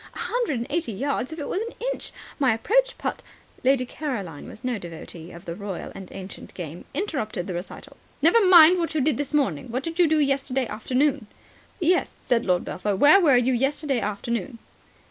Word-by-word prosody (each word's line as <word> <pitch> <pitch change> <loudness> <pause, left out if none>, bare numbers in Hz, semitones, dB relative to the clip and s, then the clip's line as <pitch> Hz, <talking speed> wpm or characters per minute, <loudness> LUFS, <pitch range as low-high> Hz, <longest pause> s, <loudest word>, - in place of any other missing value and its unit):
A - - -8
hundred 475 - -1
and 235 - -3
eighty 320 -7 -1
yards 270 +4 -2
if 320 - -6
it 295 - -4
was 380 - -1
an 460 +1 -6 0.2
inch. - - -7 0.3
My 260 -6 +3
approach - - +1
putt - - -3 0.2
" - - -29
Lady 260 0 +3
Caroline, 225 - -5
who - - -9
was 235 - -12
no 250 -4 -1
devotee 170 -1 -9
of 170 +2 -12
the 170 - -4
royal 200 -1 -6
and 190 -2 -10
ancient 190 0 -9
game, 170 -1 -7
interrupted 275 - -2
the 185 - -4
recital. 175 +2 -8 0.2
"Never 340 +9 +5
mind 360 -1 +8
what 335 -1 -2
you 305 - +2
did 285 -1 +2
this 290 -1 -3
morning. 260 - 0
What 255 +3 -2
did 330 +2 -5
you 350 - +6
do 315 0 +3
yesterday 275 -2 +1
afternoon?" 260 +2 0 0.5
"Yes," 360 +1 +1
said 240 -3 +1
Lord 180 -1 +2
Belpher. 205 +1 -2
"Where 290 - +7
were 285 -7 +5
you 250 +1 +2
yesterday 270 +1 0
afternoon?" 230 +4 -3
260 Hz, 205 wpm, -25 LUFS, 205-310 Hz, 0.5 s, mind